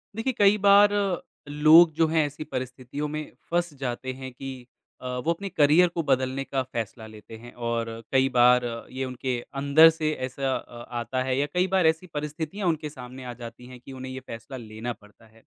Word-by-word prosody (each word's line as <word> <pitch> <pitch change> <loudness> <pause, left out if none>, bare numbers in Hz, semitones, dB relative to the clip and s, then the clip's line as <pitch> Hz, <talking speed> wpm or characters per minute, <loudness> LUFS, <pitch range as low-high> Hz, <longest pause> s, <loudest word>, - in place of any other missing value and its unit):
देखिए 240 +4 -1
कई 205 0 +6
बार 200 +1 +7 0.6
लोग 155 +3 +7
जो 160 0 +2
है 160 0 +2
ऐसी 145 +1 -6
परिस्थितियों 130 +2 -5
में 155 0 -5 0.2
फँस 175 -2 0
जाते 130 0 -4
है 130 0 -8
कि 135 +2 -8 0.5
अ, - - -10 0.2
वो 165 - +3
अपने 195 +4 -6
करियर 160 +1 +5
को 170 - +1
बदलने 130 +1 +1
का 135 -1 -2
फैसला 115 0 -4
लेते 110 +1 -12
हैं। 120 +2 -13
और 115 -1 -2 0.3
कई 130 0 +4
बार 125 0 +5 0.3
ये 130 +1 -3
उनके 125 -1 -3 0.2
अंदर 150 +3 +7
से 160 -1 -1
ऐसा 130 +1 -2
अ, 120 - -8 0.2
आता 130 +2 -2
है 130 0 -1
या 140 - +2
कई 180 +1 +2
बार 190 -3 +3
ऐसी 160 +3 0
परिस्थितियाँ 155 +6 -4
उनके 155 -2 -1
सामने 130 -2 -10
आ 125 - -5
जाती 115 +1 -9
है 125 0 -11
कि 125 - -13
उन्हें 130 0 -7
ये 130 - -6
फैसला 115 +3 -8
लेना 115 +1 -6
पड़ता 105 +1 -21
है। 110 +1 -23
135 Hz, 195 wpm, -26 LUFS, 125-160 Hz, 0.6 s, बार